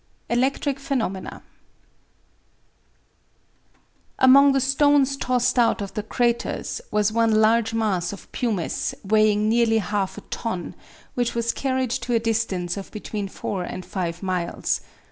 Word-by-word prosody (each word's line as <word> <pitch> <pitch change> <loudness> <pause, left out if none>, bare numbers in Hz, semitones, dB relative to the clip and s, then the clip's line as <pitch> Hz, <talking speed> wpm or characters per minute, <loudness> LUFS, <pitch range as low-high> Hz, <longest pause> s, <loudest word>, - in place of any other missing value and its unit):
ELECTRIC 270 +3 0
PHENOMENA 240 - -3 2.7
Among 275 +2 +7
the 270 - +3
stones 275 +1 +3
tossed 250 -2 +1
out 235 - +3
of 200 -1 -5
the 210 - -2
craters 235 +2 -1
was 210 0 +1
one 230 0 +2
large 225 +1 +3
mass 195 -6 0
of 200 - -11
pumice 215 -9 -2
weighing 215 +1 +3
nearly 225 0 +3
half 205 -1 -2
a - - -7
ton, 185 -7 -4 0.4
which 245 -1 -1
was 235 0 +1
carried 260 -2 -1
to 245 0 -1
a - - +4
distance 210 -6 -1
of 195 - -7
between 210 -1 -5
four 190 0 -4
and 185 0 -6
five 175 -1 -4
miles. 180 -2 -1
225 Hz, 130 wpm, -23 LUFS, 200-250 Hz, 2.7 s, Among